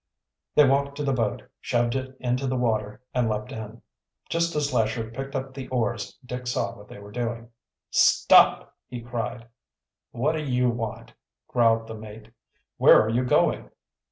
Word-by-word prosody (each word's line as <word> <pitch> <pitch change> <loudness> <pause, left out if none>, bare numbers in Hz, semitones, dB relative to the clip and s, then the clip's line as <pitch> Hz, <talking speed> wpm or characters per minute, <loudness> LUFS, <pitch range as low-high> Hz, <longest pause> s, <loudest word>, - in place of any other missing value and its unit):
They 150 -2 +7
walked 140 +1 +1
to 150 - -2
the 135 -1 +1
boat, 115 -5 -1 0.2
shoved 120 -1 0
it 130 0 -4
into 125 +2 -1
the 130 - -1
water, 110 -1 -1
and 125 -2 +1
leaped 105 0 -3
in. 110 +1 -8 0.5
Just 170 0 0
as 145 -2 0
Lesher 110 -1 0
picked 135 +3 -6
up 135 0 -4
the 130 -1 -7
oars 120 -3 -2
Dick 125 0 -6
saw 100 -5 -1
what 105 0 -14
they - - -11
were 100 0 -12
doing. 115 0 -4 0.4
"Stop!" - - +5
he 125 - -6
cried. 120 0 -5 0.6
"What 135 +6 0
do 160 -1 -3
you 125 -3 +1
want?" 115 -2 -6 0.3
growled 115 -2 +2
the 110 - -7
mate. 110 0 -11 0.5
"Where - - +7
are 110 - +1
you 120 +3 +1
going?" 125 - +1
120 Hz, 170 wpm, -25 LUFS, 110-130 Hz, 0.6 s, They